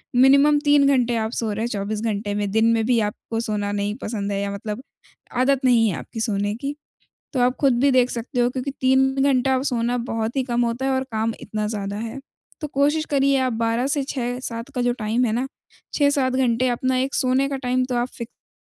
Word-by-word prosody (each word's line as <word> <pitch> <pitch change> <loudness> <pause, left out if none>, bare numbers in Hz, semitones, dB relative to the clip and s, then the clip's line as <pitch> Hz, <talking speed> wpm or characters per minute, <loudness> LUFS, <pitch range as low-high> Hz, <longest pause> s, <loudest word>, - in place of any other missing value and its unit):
Minimum 280 +3 +6
3 290 -1 +5
घंटे 250 -4 +2
आप 220 -1 -1
सो 225 -2 -1
रहे, 220 +3 -2
24 210 -1 -3
घंटे 210 -2 -2
में, 205 -1 -1
दिन 220 +2 +3
में 225 -1 +1
भी 240 0 +3
आपको 225 +2 -5
सोना 210 -3 -2
नहीं 205 0 -2
पसंद 205 -2 -3
है 200 0 -1
या 200 0 -2
मतलब 210 +4 -5 0.6
आदत 270 0 +2
नहीं 235 -3 +5
है 185 - -2
आपकी 225 - -8
सोने 205 -3 0
की, 280 +5 -4 0.6
तो 260 - 0
आप 250 +1 +2
खुद 275 -3 +4
भी 280 0 +4
देख 250 -1 +4
सकते 245 +2 -4
हो 240 0 +3
क्योंकि 260 +2 -4
3 265 +1 +3
घंटा 265 -1 +3
अब 255 - 0
सोना 240 0 0
बहुत 225 +2 -2
ही 265 - +2
कम 240 -1 -1
होता 235 +3 -2
है 270 - +1
और 260 0 0
काम 220 +1 -1
इतना 215 -1 -3
ज़्यादा 200 -2 -4
है। 230 +4 -5 0.4
तो 300 - -3
कोशिश 290 +3 +1
करिए, 275 -2 +2
आप 255 -2 0
12 230 +3 0
से 285 0 0
6-7 245 -2 -4
का 250 - 0
जो 245 0 +2
टाइम 225 +3 +1
है 225 - 0
ना, 250 +3 -1 0.5
6-7 285 -3 +2
घंटे 255 -1 +2
अपना 255 +2 0
एक 265 +2 -1
सोने 260 +1 +2
का 275 - -2
टाइम 255 +1 +1
तो 250 -1 -3
आप 240 +1 0
फिक्स 235 -1 -10
245 Hz, 220 wpm, -22 LUFS, 220-265 Hz, 0.6 s, Minimum